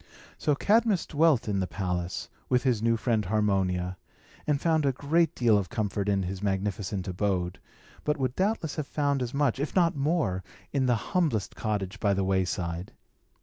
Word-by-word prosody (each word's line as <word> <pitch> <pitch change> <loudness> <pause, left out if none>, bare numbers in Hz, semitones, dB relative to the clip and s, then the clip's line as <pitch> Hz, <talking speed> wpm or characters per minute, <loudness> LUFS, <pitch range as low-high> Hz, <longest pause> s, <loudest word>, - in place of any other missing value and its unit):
So 150 - +2
King - - -11
Cadmus 215 -3 +4
dwelt 150 -6 +3
in 100 -2 0
the 95 - 0
palace, 90 0 -3 0.2
with 125 -1 +3
his 125 -5 +2
new 115 0 +2
friend 115 -2 +1
Harmonia, 95 -3 0 0.5
and 145 -2 +2
found 160 -1 +2
a 140 - +3
great 160 +5 +1
deal 115 -4 +4
of 95 - -4
comfort 105 -3 -1
in 100 -1 +2
his 95 +1 -4
magnificent 100 -1 -2
abode, 90 -1 -1 0.4
but 150 +1 0
would 130 -2 -1
doubtless 190 -5 0
have 150 -3 -2
found 140 -2 0
as 120 -2 -2
much, 140 -3 +1
if 145 - -3
not 170 -4 +3
more, 140 - 0 0.3
in 135 -2 +2
the 120 - +4 0.2
humblest 155 - +1
cottage 105 -2 -2
by 100 -2 +2
the 95 - 0
wayside. 90 -2 -1
110 Hz, 180 wpm, -28 LUFS, 95-145 Hz, 0.5 s, Cadmus